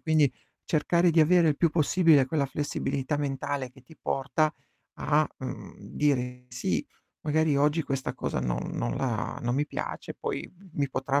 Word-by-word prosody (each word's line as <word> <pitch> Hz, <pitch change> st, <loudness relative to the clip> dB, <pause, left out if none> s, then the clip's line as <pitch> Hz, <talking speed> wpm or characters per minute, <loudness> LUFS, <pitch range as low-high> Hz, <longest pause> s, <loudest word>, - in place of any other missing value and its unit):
Quindi 155 Hz, -4 st, +3 dB, 0.3 s
cercare 170 Hz, +3 st, +3 dB
di 165 Hz, 0 st, +4 dB
avere 170 Hz, +1 st, +5 dB
il 150 Hz, -, +2 dB
più 170 Hz, +1 st, +3 dB
possibile 160 Hz, -3 st, +4 dB
quella 140 Hz, 0 st, 0 dB
flessibilità 140 Hz, 0 st, -2 dB
mentale 140 Hz, -2 st, -2 dB
che 130 Hz, -, -17 dB
ti 160 Hz, +5 st, -17 dB
porta 140 Hz, +3 st, 0 dB, 0.5 s
a, 150 Hz, +1 st, +3 dB
mhmm, 130 Hz, -, -7 dB
dire: 125 Hz, -3 st, -1 dB
"Sì, 120 Hz, 0 st, -1 dB, 0.4 s
magari 155 Hz, -1 st, +2 dB
oggi 150 Hz, +3 st, +3 dB
questa 135 Hz, -1 st, -2 dB
cosa -, -, -2 dB
non -, -, -2 dB
non -, -, -2 dB
la 120 Hz, -5 st, -2 dB
non 120 Hz, 0 st, 0 dB
mi 145 Hz, +2 st, +1 dB
piace, -, -, -5 dB
poi -, -, -4 dB, 0.2 s
mi 140 Hz, -3 st, 0 dB
potrà 135 Hz, +2 st, +1 dB
145 Hz, 160 wpm, -28 LUFS, 130-155 Hz, 0.5 s, avere